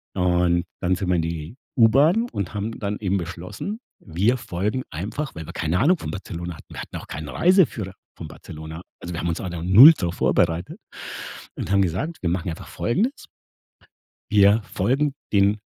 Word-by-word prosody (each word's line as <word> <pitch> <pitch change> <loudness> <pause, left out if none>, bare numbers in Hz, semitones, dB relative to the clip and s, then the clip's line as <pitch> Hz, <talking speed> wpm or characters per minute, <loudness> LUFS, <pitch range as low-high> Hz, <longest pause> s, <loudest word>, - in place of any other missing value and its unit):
Und 90 -2 +2 0.2
dann 90 +1 +2
sind 95 -1 -3
wir 90 - +3
in 85 - +2
die 80 +3 -5 0.2
U-Bahn 145 - +5
und 100 - -4
haben 105 +2 -4
dann 105 0 -2
eben 100 -2 0
beschlossen: 90 - -6 0.2
Wir 100 +9 +1
folgen 105 +3 -2
einfach- 105 - -5
weil 80 -1 -6
wir - - -8
keine 80 +2 0
Ahnung 175 +8 +4
von 145 - -6
Barcelona 85 -3 -6
hatten- - - -15
wir - - -7
hatten - - -9
auch - - -10
keinen 75 +1 -6
Reiseführer 150 - +2 0.2
von - - -7
Barcelona. 80 +1 -9 0.2
Also, 85 - -6
wir 85 - -3
haben - - -2
uns 80 - -2
auch 95 - -4
da 85 -2 -5
0 110 - +10
drauf 85 -1 -2
vorbereitet 85 0 +1 0.8
und - - -4
haben 100 -1 +4
gesagt: 100 - -1
„Wir 90 - 0
machen 90 0 -1
einfach 90 +4 -7
Folgendes:“ 225 - -1 1.1
Wir 105 +1 +5
folgen 140 +6 0 0.2
den 100 +1 +3
95 Hz, 185 wpm, -23 LUFS, 85-115 Hz, 1.1 s, 0